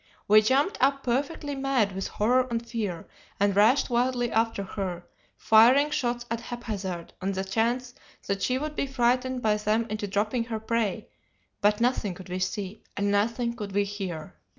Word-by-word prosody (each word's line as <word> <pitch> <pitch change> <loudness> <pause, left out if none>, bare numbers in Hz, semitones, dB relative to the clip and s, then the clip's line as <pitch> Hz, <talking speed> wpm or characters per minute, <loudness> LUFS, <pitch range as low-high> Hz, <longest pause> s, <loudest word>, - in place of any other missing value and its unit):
We 215 +1 +7
jumped 270 - +1
up 275 +1 +2
perfectly 285 +4 -1
mad 270 -6 +1
with 190 0 -4
horror 250 +4 +2
and 235 0 -3
fear, 210 -8 -4 0.3
and 200 -1 +2
rushed 225 +6 +4
wildly 245 0 +1
after 225 -2 +1
her, 185 -3 -4 0.3
firing 250 +7 +5
shots 245 -5 -1
at 230 0 -2
haphazard 200 -9 -5
on 195 +1 -1
the 190 0 -2
chance 235 +5 -1 0.3
that 195 0 -2
she 255 - +1
would 300 +2 -4
be 275 - -1
frightened 255 0 0
by 210 -1 +3
them 215 +2 +1
into 210 -1 -3
dropping 215 +4 0
her 225 -2 -4
prey, 220 -2 -1 0.5
but 210 +1 +3
nothing 235 -6 0
could 185 0 -11
we 180 +1 -3
see, 190 +2 -3 0.2
and 200 0 +1
nothing 230 +4 +1
could 205 -4 -6
we 205 +1 +3
hear. 190 -6 -5
225 Hz, 175 wpm, -27 LUFS, 200-250 Hz, 0.5 s, We